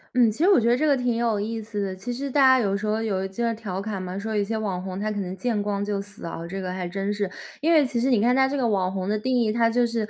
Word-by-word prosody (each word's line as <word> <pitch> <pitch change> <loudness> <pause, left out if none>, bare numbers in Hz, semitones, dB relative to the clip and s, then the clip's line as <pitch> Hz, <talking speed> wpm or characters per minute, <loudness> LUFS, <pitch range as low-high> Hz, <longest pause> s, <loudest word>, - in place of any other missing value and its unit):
嗯， 240 -3 +5
其 215 - -9
实 355 - +4
我 395 - +6
觉 230 - +1
得 240 - +5
这 305 +5 +1
个 285 -2 +4
挺 245 -2 0
有 230 -3 +1
意 225 +2 -3
思 210 -1 -4
的， 190 - -4
其 195 +6 -6
实 270 +3 -4
大 285 - +3
家 260 -1 +7
有 200 -4 +1
时 205 +2 -3
候 215 +1 +1
有 200 -4 -1
一 195 - -5
些 230 +3 -1
调 205 -4 -5
侃 200 -1 -4
嘛， 185 +1 -5
说 215 +1 -3
有 205 - +2
一 - - +1
些 220 +2 -2
网 195 -4 -2
红 185 0 -5
他 215 +1 -1
可 205 - -3
能 185 -1 -4
见 230 -3 -1
光 205 0 -2
就 205 -1 -2
死 205 -1 -11
啊， 165 - -5
这 195 +2 -4
个 185 -1 -4
还 185 -1 -3
真 195 +2 -2
是。 205 -2 -2 0.3
因 325 +3 +2
为 305 -4 +5
其 250 -2 -2
实 260 - +2
你 245 -5 +4
看 245 +4 +3
它 265 0 +4
这 280 +2 -2
个 250 -3 +1
网 190 -4 +1
红 190 -1 -3
的 210 +1 0
定 255 +3 +1
义， 225 -2 +2
它 230 0 +3
就 240 +1 +2
是， 230 -2 -2
215 Hz, 370 characters per minute, -24 LUFS, 195-240 Hz, 0.3 s, 家